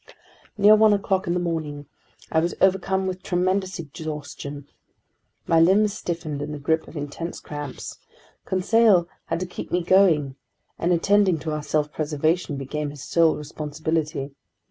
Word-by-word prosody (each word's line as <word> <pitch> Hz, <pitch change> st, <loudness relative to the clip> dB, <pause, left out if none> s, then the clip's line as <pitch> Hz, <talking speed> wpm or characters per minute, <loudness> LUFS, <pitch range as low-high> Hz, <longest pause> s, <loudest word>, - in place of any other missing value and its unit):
Near 210 Hz, +1 st, +7 dB
one 215 Hz, 0 st, +5 dB
o'clock 195 Hz, -2 st, 0 dB
in 170 Hz, -, +1 dB
the -, -, +1 dB
morning, 155 Hz, -4 st, -3 dB, 0.5 s
I 160 Hz, -, +3 dB
was 170 Hz, +2 st, -1 dB
overcome 190 Hz, 0 st, +2 dB
with 185 Hz, 0 st, -3 dB
tremendous 185 Hz, +1 st, 0 dB
exhaustion. 145 Hz, -3 st, -7 dB, 0.8 s
My 165 Hz, -, +3 dB
limbs 200 Hz, +5 st, +4 dB
stiffened 165 Hz, -6 st, -4 dB
in 150 Hz, +1 st, -4 dB
the -, -, -5 dB
grip 160 Hz, +3 st, 0 dB
of -, -, -10 dB
intense 145 Hz, +4 st, -5 dB
cramps. 145 Hz, -2 st, -7 dB, 0.4 s
Conseil 190 Hz, -1 st, +3 dB, 0.2 s
had 165 Hz, -, -2 dB
to -, -, -1 dB
keep 180 Hz, -, -8 dB
me 180 Hz, 0 st, +1 dB
going, 165 Hz, -8 st, +3 dB, 0.4 s
and 175 Hz, -, +1 dB
attending 190 Hz, +1 st, +3 dB
to 160 Hz, -, -3 dB
our 150 Hz, 0 st, -2 dB
self 150 Hz, 0 st, -1 dB
preservation 155 Hz, +1 st, -1 dB
became 145 Hz, +2 st, -3 dB
his 145 Hz, -2 st, -9 dB
sole 165 Hz, -2 st, +3 dB
responsibility. 150 Hz, -1 st, -3 dB
165 Hz, 150 wpm, -24 LUFS, 150-185 Hz, 0.8 s, Near